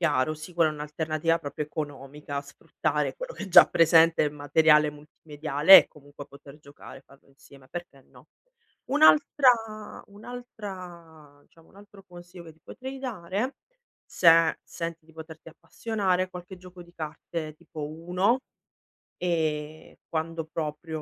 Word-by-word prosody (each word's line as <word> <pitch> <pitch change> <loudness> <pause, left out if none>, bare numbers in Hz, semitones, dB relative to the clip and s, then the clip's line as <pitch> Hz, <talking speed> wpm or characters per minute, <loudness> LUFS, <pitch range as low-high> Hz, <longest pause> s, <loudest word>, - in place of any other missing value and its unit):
Chiaro, 150 -3 +1
sì, 155 +3 -11
quella 165 -2 +2
è - - -6
un'alternativa 155 +2 -2
proprio 145 0 -6
economica, 145 -1 -6
sfruttare 140 - -3
quello - - -7
che - - -7
è - - -9
già 180 - +8
presente 165 0 +4
nel 150 -1 -1
materiale 150 +1 +3
multimediale 150 +2 +4
e - - -28
comunque 145 -1 -14
poter 140 +1 -15
giocare, 140 -2 -14
farlo 140 0 -23
insieme, 135 -1 -19
perché 175 -3 -9
no? - - -20 0.6
Un'altra 255 -7 +3
un'altra 185 - -11
diciamo, 165 +2 -24
un - - -22
altro 200 -1 -16
consiglio 175 -1 -13
che 165 -1 -13
ti 160 - -30
potrei 265 +1 -9
dare, 220 -1 -4 0.5
se 165 -1 +4
senti 165 -1 -7
di 160 - -20
poterti 160 0 -12
appassionare, 185 +2 -2
qualche 180 +1 -10
gioco 180 0 -13
di 175 0 -20
carte 155 0 -6
tipo 155 -2 -8
Uno, 180 - 0 0.8
ehm, 155 -3 -3
quando 160 0 -4
proprio 160 0 -5
165 Hz, 135 wpm, -26 LUFS, 150-180 Hz, 0.8 s, già